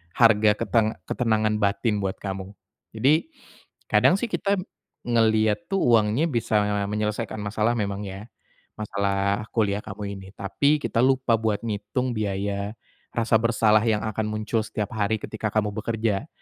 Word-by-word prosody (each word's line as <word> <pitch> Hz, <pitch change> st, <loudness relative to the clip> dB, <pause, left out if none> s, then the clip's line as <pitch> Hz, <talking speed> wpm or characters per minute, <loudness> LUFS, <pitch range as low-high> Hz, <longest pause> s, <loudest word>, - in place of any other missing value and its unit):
harga 110 Hz, -2 st, +5 dB
keteng 115 Hz, -1 st, +1 dB
ketenangan 110 Hz, -2 st, 0 dB
batin 105 Hz, +1 st, +1 dB
buat 95 Hz, 0 st, -2 dB
kamu. 95 Hz, 0 st, -6 dB, 0.4 s
Jadi, 140 Hz, -, +3 dB, 0.6 s
kadang -, -, +5 dB
sih 220 Hz, +3 st, -3 dB
kita 200 Hz, 0 st, +1 dB, 0.5 s
ngelihat 110 Hz, +4 st, +2 dB
tuh 195 Hz, -1 st, 0 dB
uangnya 115 Hz, +4 st, +3 dB
bisa 110 Hz, -4 st, +1 dB, 0.2 s
menyelesaikan 105 Hz, +1 st, -2 dB
masalah 110 Hz, +3 st, 0 dB
memang 100 Hz, -2 st, -3 dB
ya. 95 Hz, +1 st, -7 dB, 0.6 s
Masalah 100 Hz, -1 st, 0 dB
kuliah 105 Hz, -2 st, 0 dB
kamu 100 Hz, -1 st, -6 dB
ini, 95 Hz, -1 st, -10 dB
tapi 140 Hz, +11 st, +1 dB
kita 120 Hz, -4 st, 0 dB
lupa 130 Hz, -2 st, +3 dB
buat 110 Hz, -2 st, 0 dB
ngitung 115 Hz, +3 st, -2 dB
biaya 100 Hz, -1 st, -2 dB, 0.4 s
rasa 115 Hz, -1 st, +1 dB
bersalah 110 Hz, -2 st, +3 dB
yang 110 Hz, -2 st, +2 dB
akan 110 Hz, 0 st, -2 dB
muncul 110 Hz, +1 st, -1 dB
setiap 105 Hz, -1 st, -4 dB
hari 110 Hz, +1 st, 0 dB
ketika 110 Hz, 0 st, -4 dB
kamu 105 Hz, -1 st, 0 dB
bekerja. 110 Hz, +2 st, -1 dB
110 Hz, 140 wpm, -25 LUFS, 100-115 Hz, 0.6 s, harga